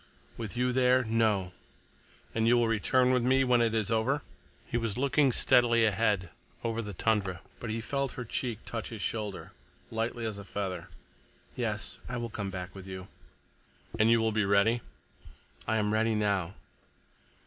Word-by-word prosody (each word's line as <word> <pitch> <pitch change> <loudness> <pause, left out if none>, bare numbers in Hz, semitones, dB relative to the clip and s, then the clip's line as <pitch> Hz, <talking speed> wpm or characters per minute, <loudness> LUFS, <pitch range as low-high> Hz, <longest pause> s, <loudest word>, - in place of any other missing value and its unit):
"With 115 0 -6
you 125 +1 +2
there—no." 115 -7 +2 0.8
"And 110 0 +1
you 120 +1 +5
will 120 -1 +3
return 125 +3 +3
with 125 -1 +3
me—when 125 -1 +3
it 115 -1 +2
is 110 -1 0
over?" 125 +6 +1 0.4
He - - -6
was 115 -2 0
looking 140 +1 +3
steadily 120 -1 +4
ahead 105 -4 +1 0.3
over 115 0 -1
the 105 -3 -7
tundra. 95 -4 0 0.2
But 120 - -5
he 115 +1 -2
felt 140 +2 -2
her 125 - -6
cheek 115 -1 -3
touch 115 -2 -4
his 110 -4 -5
shoulder, 105 -3 -3 0.4
lightly 115 +1 -2
as 105 -2 -3
a - - -7
feather. 95 -3 -4 0.7
"Yes, - - -3
I 125 - -3
will 120 -1 -4
come 100 -2 -4
back 90 -1 -6
with 95 -1 -10
you." 95 0 -7 0.9
"And 110 +1 +5
you 115 0 +5
will 110 0 +1
be 105 0 +1
ready?" 100 +4 +3 0.9
"I 110 - +2
am 105 0 +1
ready 110 0 +2
now." 100 -3 0
115 Hz, 165 wpm, -30 LUFS, 100-120 Hz, 0.9 s, you